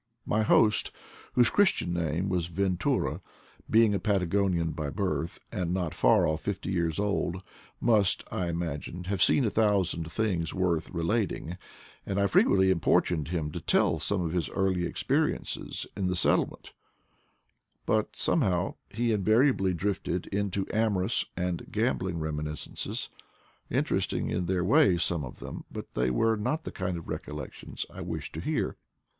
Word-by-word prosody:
My 110 Hz, -, +1 dB
host, 110 Hz, 0 st, +4 dB, 0.4 s
whose 120 Hz, -2 st, +4 dB
Christian 190 Hz, -, +2 dB
name 85 Hz, +2 st, -1 dB
was 90 Hz, -3 st, 0 dB
Ventura, 90 Hz, +1 st, 0 dB, 0.5 s
being 110 Hz, -1 st, +5 dB
a 100 Hz, -, +1 dB
Patagonian 95 Hz, -4 st, +1 dB
by 80 Hz, -2 st, -3 dB
birth, 90 Hz, -1 st, -2 dB
and 90 Hz, -2 st, -2 dB
not 90 Hz, -4 st, -2 dB
far 90 Hz, -, +4 dB
off 80 Hz, 0 st, 0 dB
fifty 100 Hz, -1 st, -3 dB
years 85 Hz, -4 st, 0 dB
old, 95 Hz, -3 st, -1 dB, 0.4 s
must, 105 Hz, -5 st, +3 dB
I 90 Hz, -, -1 dB
imagined, 85 Hz, +1 st, -4 dB
have 95 Hz, 0 st, -2 dB
seen 135 Hz, -, +4 dB
a 105 Hz, -, +1 dB
thousand 95 Hz, -7 st, +1 dB
things 90 Hz, -6 st, 0 dB
worth 85 Hz, -4 st, 0 dB
relating, 90 Hz, 0 st, -1 dB, 0.5 s
and 100 Hz, 0 st, -2 dB
I 100 Hz, -, +3 dB
frequently 95 Hz, -1 st, +4 dB
impor 85 Hz, -, +3 dB
tuned 80 Hz, -5 st, -2 dB
him 80 Hz, -3 st, -2 dB
to -, -, -5 dB
tell -, -, +2 dB
some 100 Hz, -2 st, 0 dB
of 80 Hz, -, -2 dB
his 85 Hz, -2 st, -1 dB
early 95 Hz, -2 st, 0 dB
experiences -, -, -1 dB
in 95 Hz, -2 st, -1 dB
the 90 Hz, -, 0 dB
settlement 90 Hz, -, +1 dB, 1.1 s
But -, -, 0 dB
somehow 90 Hz, 0 st, +1 dB
he 115 Hz, +2 st, 0 dB
invariably 110 Hz, -1 st, +3 dB
drifted 90 Hz, -1 st, -2 dB
into 100 Hz, -1 st, -1 dB
amorous 105 Hz, -4 st, +1 dB
and 90 Hz, -1 st, -3 dB
gambling 90 Hz, -2 st, 0 dB
reminiscences, 75 Hz, -1 st, -3 dB, 0.6 s
inter -, -, +1 dB
esting -, -, -2 dB
in 90 Hz, -1 st, -1 dB
their 90 Hz, -1 st, +1 dB
way, 110 Hz, -, +5 dB
some 85 Hz, -2 st, 0 dB
of 65 Hz, -, -8 dB
them, -, -, -7 dB
but -, -, -8 dB
they 60 Hz, +1 st, +1 dB
were 110 Hz, -, +2 dB
not 155 Hz, +10 st, -1 dB
the -, -, -5 dB
kind 90 Hz, -1 st, -3 dB
of 85 Hz, -, -9 dB
recollections -, -, -6 dB
I -, -, -7 dB
wished -, -, -5 dB
to -, -, -5 dB
hear. -, -, -1 dB
90 Hz, 155 wpm, -29 LUFS, 85-100 Hz, 1.1 s, being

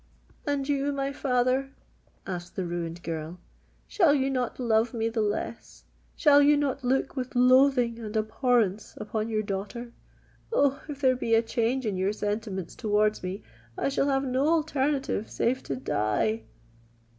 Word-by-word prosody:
"And 280 Hz, -1 st, 0 dB
you, 285 Hz, 0 st, 0 dB
my 275 Hz, 0 st, -2 dB
father," 255 Hz, 0 st, +1 dB, 0.6 s
asked 180 Hz, -2 st, -6 dB
the 190 Hz, -, -2 dB
ruined 170 Hz, 0 st, -4 dB
girl,—"shall 175 Hz, -, -2 dB
you 270 Hz, -1 st, +1 dB
not 250 Hz, -2 st, -2 dB
love 230 Hz, -1 st, +1 dB
me 225 Hz, 0 st, 0 dB
the 225 Hz, -1 st, -1 dB
less? 210 Hz, +2 st, -4 dB, 0.3 s
Shall 290 Hz, -2 st, +6 dB
you 290 Hz, +1 st, +5 dB
not 280 Hz, -2 st, -1 dB
look 260 Hz, +2 st, 0 dB
with 255 Hz, -1 st, -4 dB
loathing 250 Hz, -1 st, +4 dB
and 220 Hz, -1 st, -4 dB
abhorrence 220 Hz, -2 st, 0 dB
upon 215 Hz, +1 st, -3 dB
your 215 Hz, -1 st, 0 dB
daughter? 205 Hz, +4 st, -5 dB, 0.6 s
Oh! 280 Hz, -, +2 dB
if 285 Hz, -1 st, -6 dB
there 260 Hz, -2 st, +4 dB
be 230 Hz, -2 st, +1 dB
a 225 Hz, -, +3 dB
change 235 Hz, +2 st, 0 dB
in 205 Hz, -4 st, -1 dB
your 190 Hz, +2 st, 0 dB
sentiments 205 Hz, -4 st, -3 dB
towards 210 Hz, -1 st, +1 dB
me, 185 Hz, +2 st, -5 dB, 0.3 s
I -, -, 0 dB
shall 275 Hz, 0 st, +1 dB
have 270 Hz, 0 st, +1 dB
no 265 Hz, +2 st, +1 dB
alternative 290 Hz, -7 st, 0 dB
save 255 Hz, +3 st, 0 dB
to 135 Hz, -, -2 dB
die!" 130 Hz, -, -1 dB
235 Hz, 155 wpm, -27 LUFS, 210-270 Hz, 0.6 s, Shall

